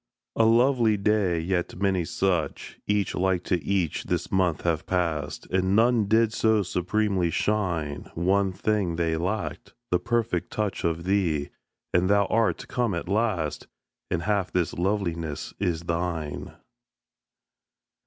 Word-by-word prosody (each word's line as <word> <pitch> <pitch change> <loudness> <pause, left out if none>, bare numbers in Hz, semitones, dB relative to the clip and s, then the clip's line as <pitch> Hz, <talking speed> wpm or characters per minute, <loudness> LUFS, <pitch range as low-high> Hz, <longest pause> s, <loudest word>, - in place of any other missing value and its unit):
A 115 - +4
lovely 115 -1 +4
day! 100 -4 +1
Yet 90 +1 -1
many 95 -3 +1
such, 90 -2 -2
Each 105 -2 +1
like 90 -1 +1
to 90 -4 -1
each, 90 -1 -1
this - - -2
month 90 -4 +1
have 80 -2 0
passed, 85 -6 -1
And 95 +1 +2
none 115 0 +4
did 110 +1 +3
so 110 -2 +3
supremely 95 0 0
shine. 85 -7 -1
One 95 +3 +2
thing 95 -2 0
they 80 -1 0
lacked: 100 +3 -3 0.2
the 90 - +3
perfect 120 -1 -1
touch 105 -3 -2
Of 85 0 -1
thee 90 -6 0 0.4
and 90 +2 +3
thou 100 0 +4
art 115 -1 +1
come 120 -6 0
at 85 - -4
last, 100 - -1 0.4
And 85 -1 -1
half 100 -1 0
this 90 -4 0
loveliness 85 -5 -2
is 90 -5 0
thine. 85 -3 -3
95 Hz, 135 wpm, -26 LUFS, 85-105 Hz, 0.4 s, A